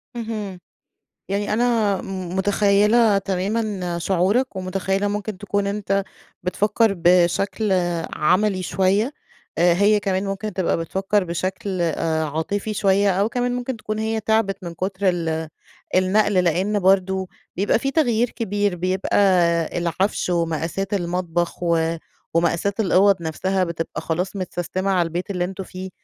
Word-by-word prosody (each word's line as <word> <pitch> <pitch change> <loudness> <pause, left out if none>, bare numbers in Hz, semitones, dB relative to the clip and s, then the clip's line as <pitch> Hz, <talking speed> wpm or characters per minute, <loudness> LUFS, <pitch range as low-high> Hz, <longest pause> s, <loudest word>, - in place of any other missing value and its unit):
اهم، 215 -5 -5 0.7
يعني 205 +2 -1
أنا 225 -3 +2
م 185 -1 -5
متخيّلة 205 +2 +3
تمامًا 195 -2 -2
شعورَك 195 +7 +1
ومتخيّلة 195 +2 -1
ممكن 205 -1 -4
تكون 205 0 -1
أنتَ 200 -1 -1 0.4
بتفكر 205 +3 +1
بشكل 180 +4 +2 0.4
عملي 185 +4 +2
شويّة. 195 - +1 0.5
آآ، 175 0 +5
هيّ 205 +3 +3
كمان 190 0 -1
ممكن 195 +1 -3
تبقى 185 -2 0
بتفكر 195 +4 0
بشكل، 185 +2 -3
آآ، 160 -1 0
عاطفي 195 +8 -2
شويّة 200 0 +3
أو 205 - +2
كمان 245 +1 -1
ممكن 250 0 -3
تكون 215 0 -4
هيّ 220 0 -1
تعبت 205 -3 0
من 170 -1 -6
كتر 190 +2 -1
ال 160 -2 -1 0.5
النقل، 200 +3 +3
لأنّ 185 +5 +1
برضو 190 0 +2 0.3
بيبقى 200 +3 +2
في 275 +3 -1
تغيير 240 -6 +2
كبير. 205 -4 -1
بيبقى 185 +2 -1 0.6
العفش 180 +2 -1
ومقاسات 170 +4 -1
المطبخ 175 -1 -2
و 165 -1 +1 0.4
ومقاسات 170 +5 +1
الأوض 195 -1 +4
نفسها 185 +4 0
بتبقى 165 -1 -4
خلاص 180 +4 -2
متسستمة 185 +1 -3
على 180 -3 +2
البيت 175 +4 -4
اللي 180 -2 -1
أنتم 190 +1 -5
فيه. 185 +1 -8
190 Hz, 130 wpm, -22 LUFS, 180-205 Hz, 0.7 s, آآ